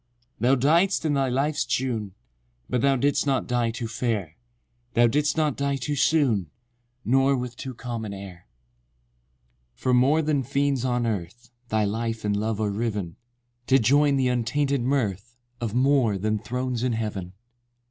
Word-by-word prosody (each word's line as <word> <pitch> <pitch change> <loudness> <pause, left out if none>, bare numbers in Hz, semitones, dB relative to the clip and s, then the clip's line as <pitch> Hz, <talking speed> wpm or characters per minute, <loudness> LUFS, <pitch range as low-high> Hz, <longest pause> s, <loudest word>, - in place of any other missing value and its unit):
IX. 120 0 -43
Thou 125 +5 +4
died'st 165 +8 +2
in 150 - +2
thy 135 -2 +1
life's 140 +4 0
June— 115 -7 -2 0.5
But 125 - 0
thou 140 +1 +3
did'st 140 +2 +1
not 135 -2 +1
die 120 -2 0
too 115 0 -4
fair: 110 -8 -2 0.6
Thou 120 - +5
did'st 150 +6 +1
not 150 -3 +1
die 140 0 -1
too 140 +2 -3
soon, 130 - +2 0.6
Nor 135 +2 +3
with 125 -1 -5
too 130 0 -7
calm 120 -1 -5
an 105 - -5
air. 95 -3 -10 1.3
X. - - -28
From 125 -1 +3
more 145 +6 +3
than 150 -2 +1
friends 140 0 0
on 125 -2 0
earth, 115 +3 -4 0.2
Thy 110 -1 +1
life 115 +1 -3
and 105 -1 +1
love 110 +1 -1
are 105 -2 0
riven, 105 -5 -3 0.5
To 135 - +5
join 140 +4 +3
the 130 -2 +2
untainted 135 +3 0
mirth 120 -3 -1 0.2
Of 115 -2 -3
more 130 -5 +3
than 105 +2 -1
thrones 125 +2 -3
in 125 -1 0
heaven— 105 -5 -4
XII. 120 +2 -48
120 Hz, 170 wpm, -25 LUFS, 110-135 Hz, 1.3 s, Thou